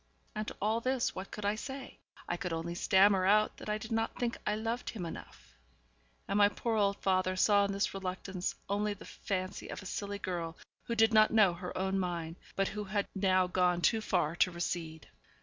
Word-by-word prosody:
And 215 0 -3
to - - -5
all 220 +3 +1
this 255 0 0
what 190 +1 -6
could 210 - -6
I 205 - +2
say? 265 +4 -7 0.3
I 175 - -1
could 180 0 -4
only 165 +1 -3
stammer 190 +2 +4
out 215 +1 +4
that - - -8
I 210 - +1
did 220 +2 -8
not 225 0 -1
think 240 -1 -1
I 210 - +2
loved 230 +3 -2
him 195 -6 -5
enough; 165 - -10 0.7
and 200 - +1
my 205 0 +7
poor 230 +2 -2
old 200 -2 +2
father 185 -1 +1
saw 200 +2 +4
in 200 - -2
this 200 +1 0
reluctance 185 -1 -3
only 205 +1 0
the 200 - -12
fancy 185 -2 -4
of - - -7
a - - -12
silly 200 +2 -4
girl 170 -4 -4 0.3
who 235 - -2
did 225 0 +4
not 215 0 +7
know 210 -5 +5
her 180 +1 -6
own 190 +1 0
mind, 170 -2 -3 0.2
but 195 0 +1
who 210 0 -5
had 200 0 -1
now 185 -2 +3
gone 180 -1 +2
too 220 +4 +3
far 175 -6 0
to 185 - +4
recede. 170 -2 -4
195 Hz, 210 wpm, -32 LUFS, 180-215 Hz, 0.7 s, my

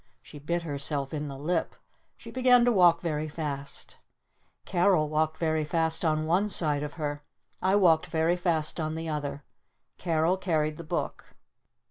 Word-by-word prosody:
She 145 - -12
bit 170 +4 -2
herself 140 -2 -2
in 150 -1 -3
the 135 -1 -7
lip. 165 +4 -2 0.4
She - - -11
began 250 -1 +4
to 245 - +4
walk 180 -5 +5
very 155 -2 -2
fast. 145 -3 -6 0.7
Carol 175 -3 +2
walked 155 +1 0
very 160 -2 0
fast 160 +2 0
on 155 -1 +1
one 185 +6 +1
side 150 -6 +1
of 150 0 -5
her. 145 -2 -4 0.4
I 190 +1 +2
walked 175 -4 +4
very 165 +1 +1
fast 170 -3 -1
on 155 0 -2
the 165 0 -5
other. 145 -2 -4 0.6
Carol 165 +1 +1
carried 155 -5 -1
the 170 - -7
book. 170 +2 -5
160 Hz, 160 wpm, -28 LUFS, 150-175 Hz, 0.7 s, walk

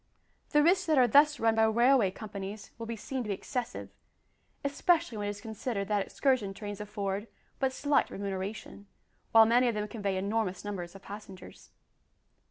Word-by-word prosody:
The 295 -1 +4
risks 365 +3 +3
that 310 -2 +3
are 250 -1 +6
thus 295 +5 +5
run 225 0 +3
by 225 0 +4
railway 235 -1 +4
companies 200 0 -7
will 230 - -5
be 230 - -3
seen 260 +5 -4
to - - -7
be 200 - -1
excessive, 245 +4 -5 0.7
especially 285 -3 +1
when 205 - -2
it - - -1
is 205 0 -6
considered 220 -2 -4
that 205 -2 +2
excursion 245 -8 0
trains 205 -1 -6
afford 205 0 -3 0.3
but 265 -1 +1
slight 285 +2 +1
remuneration, 200 +1 -5 0.4
while 225 0 +8
many 245 +3 +4
of 235 - 0
them 210 0 -2
convey 205 -3 -2
enormous 200 -1 -2
numbers 185 -3 -5
of 195 - -12
passengers. 200 -2 -11
215 Hz, 175 wpm, -30 LUFS, 200-250 Hz, 0.7 s, while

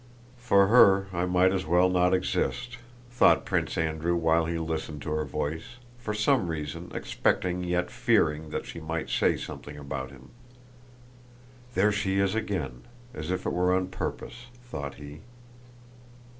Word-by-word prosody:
"For 100 -5 +4
her 100 -3 +6
I 85 0 0
might 90 +1 +3
as 95 -2 -2
well 90 +2 +4
not 90 0 +2
exist!" 120 +6 -1 0.3
thought 120 - +4
Prince - - -1
Andrew 80 +1 0
while 80 -1 +2
he 85 0 -2
listened 80 -2 -4
to 75 - -4
her 75 0 -1
voice, 80 - -4 0.2
for 115 -3 -4
some 105 0 +2
reason 75 -3 -5
expecting 90 0 -1
yet 90 0 -1
fearing 105 - +1
that - - -4
she - - -8
might 80 0 -4
say - - +2
something 75 0 -8
about 70 -2 -5
him. 65 -1 -15 1.4
"There 105 +3 +4
she 100 -2 0
is 100 0 +2
again! 85 - -3 0.3
As 80 -3 -6
if 95 - -2
it - - -1
were 90 +1 +2
on 95 0 -1
purpose," 120 +5 -6 0.2
thought 70 - -6
he. 75 +1 -10
90 Hz, 155 wpm, -27 LUFS, 80-95 Hz, 1.4 s, her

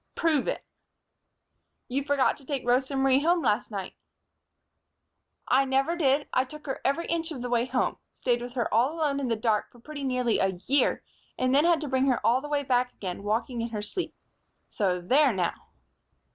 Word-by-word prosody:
"Prove 315 -5 +1
it." - - -2 1.2
"You 275 +2 -1
forgot 280 -1 +2
to 280 - -17
take 270 -2 -4
Rosa 260 +3 +1
Marie 270 0 +4
home 340 +2 +2
last - - +1
night." - - -5 1.5
"I 265 +2 +4
never 270 +5 +1
did. 285 -3 +2
I 255 - +3
took 300 +3 -12
her 270 - -4
every 280 +5 0
inch 330 0 -1
of 260 -6 -6
the 245 - -4
way 240 0 +2
home, 255 0 0 0.2
stayed 240 -2 0
with 245 0 -7
her 245 -3 -1
all 250 +8 +3
alone 295 -4 0
in 270 - -2
the 230 - +1
dark 215 -1 0
for - - -18
pretty 285 +3 -8
nearly 250 -3 +1
a 190 -1 0
year, 275 -1 +2 0.3
and 255 0 +1
then 290 +4 +5
had 340 -2 +3
to 300 - -3
bring 265 0 +1
her 255 -3 +2
all 250 +3 +4
the 295 - -7
way 290 -1 0
back 250 -1 +1
again, 185 -1 -6
walking 230 +4 -1
in 230 - -3
her 210 -2 -4
sleep. 365 - -4 0.6
So 185 -3 0
there, 270 +9 +4
now!" 180 -5 0
260 Hz, 200 wpm, -27 LUFS, 240-285 Hz, 1.5 s, then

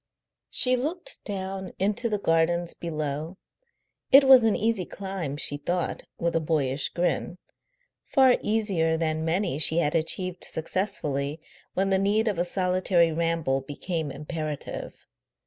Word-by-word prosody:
She 255 0 +3
looked 335 - -4
down 190 -2 -5
into 210 +4 0
the 210 - 0
gardens 170 -1 +1
below. 155 +1 -4 0.7
It 275 +1 +9
was 265 -2 +8
an 220 -2 +3
easy 220 -3 0
climb, 190 -7 -5
she 145 -1 0
thought, 175 +4 -2
with 170 0 -1
a - - +4
boyish 145 -4 0
grin 175 0 -1 0.7
far 260 -2 +4
easier 195 -7 +1
than 160 -1 -1
many 165 -3 0
she 160 +1 +2
had 150 -3 +2
achieved 175 +2 -1
successfully 155 -4 -2 0.4
when 195 +1 +1
the 190 - +3
need 210 +3 +2
of 205 -5 0
a 175 - +1
solitary 180 -2 +2
ramble 165 -4 0
became 155 +3 -4
imperative. 150 +1 -6
175 Hz, 135 wpm, -26 LUFS, 155-195 Hz, 0.7 s, It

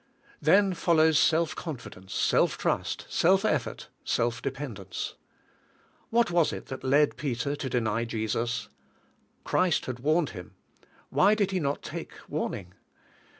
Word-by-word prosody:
Then 195 -1 +4
follows 160 -3 +4
self 165 0 +3
confidence, 115 - -8
self - - +2
trust, - - -1
self 190 +4 +3
effort, 155 - -1
self 120 0 0
dependence. 125 -9 -5 1.0
What 230 -3 +2
was 170 -2 +3
it - - -6
that 130 - -6
led 145 +3 +3
Peter 140 0 -2
to 140 -2 -4
deny 115 -1 0
Jesus? 115 0 -2 0.7
Christ 180 -3 +1
had 125 -1 -5
warned 155 +3 +1
him; 90 -4 -10 0.6
why 205 +3 +5
did 200 -2 +1
he 190 - 0
not 140 -3 -2
take - - -6
warning? 90 -2 -4
140 Hz, 130 wpm, -28 LUFS, 115-170 Hz, 1.0 s, why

